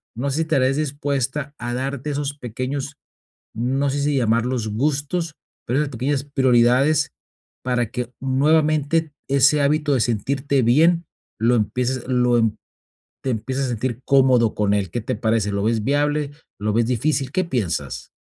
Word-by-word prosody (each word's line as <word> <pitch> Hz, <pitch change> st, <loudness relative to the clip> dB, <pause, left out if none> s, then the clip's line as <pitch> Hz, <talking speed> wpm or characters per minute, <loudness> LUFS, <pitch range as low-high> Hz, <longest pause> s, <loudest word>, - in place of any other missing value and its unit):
No 135 Hz, +5 st, -2 dB
sé 140 Hz, -, -2 dB
si -, -, +1 dB
estarías 135 Hz, -3 st, +1 dB
dispuesta 145 Hz, -1 st, -2 dB
a 120 Hz, 0 st, -4 dB
darte 135 Hz, +2 st, -3 dB
esos 145 Hz, 0 st, -3 dB
pequeños, 135 Hz, +4 st, -4 dB, 0.6 s
no 130 Hz, +5 st, 0 dB
sé 140 Hz, +1 st, -2 dB
si 145 Hz, +1 st, +1 dB
llamarlos 115 Hz, -1 st, +1 dB
gustos, 150 Hz, +7 st, -1 dB, 0.3 s
pero 125 Hz, +3 st, 0 dB
esas 150 Hz, -, -1 dB
pequeñas 135 Hz, +3 st, -1 dB
prioridades, 135 Hz, +2 st, +3 dB, 0.5 s
para 125 Hz, -3 st, -1 dB
que 125 Hz, 0 st, -4 dB
nuevamente 150 Hz, +3 st, +2 dB, 0.2 s
ese 140 Hz, +2 st, +4 dB
hábito 150 Hz, 0 st, +2 dB
de 125 Hz, -, +1 dB
sentirte 130 Hz, +5 st, 0 dB
bien 165 Hz, +8 st, +3 dB, 0.3 s
lo 115 Hz, +2 st, +3 dB
empieces, 125 Hz, +4 st, -1 dB
lo 125 Hz, -1 st, +3 dB
em 110 Hz, -2 st, +1 dB, 0.7 s
te 130 Hz, -, -1 dB
empieces 130 Hz, +4 st, -2 dB
a -, -, -3 dB
sentir 120 Hz, +1 st, -3 dB
cómodo 130 Hz, -5 st, +4 dB
con 105 Hz, -1 st, +1 dB
él, 100 Hz, -4 st, -1 dB
¿qué 120 Hz, -, -3 dB
te 120 Hz, +2 st, -3 dB
parece? 110 Hz, -1 st, 0 dB
¿Lo 100 Hz, 0 st, -1 dB
ves 110 Hz, -1 st, +1 dB
viable? 145 Hz, +1 st, +1 dB, 0.3 s
¿Lo 105 Hz, 0 st, 0 dB
ves 115 Hz, +1 st, +2 dB
difícil? 135 Hz, +2 st, 0 dB
¿Qué 185 Hz, -, +1 dB
piensas? 90 Hz, -, -3 dB
130 Hz, 160 wpm, -22 LUFS, 120-145 Hz, 0.7 s, ese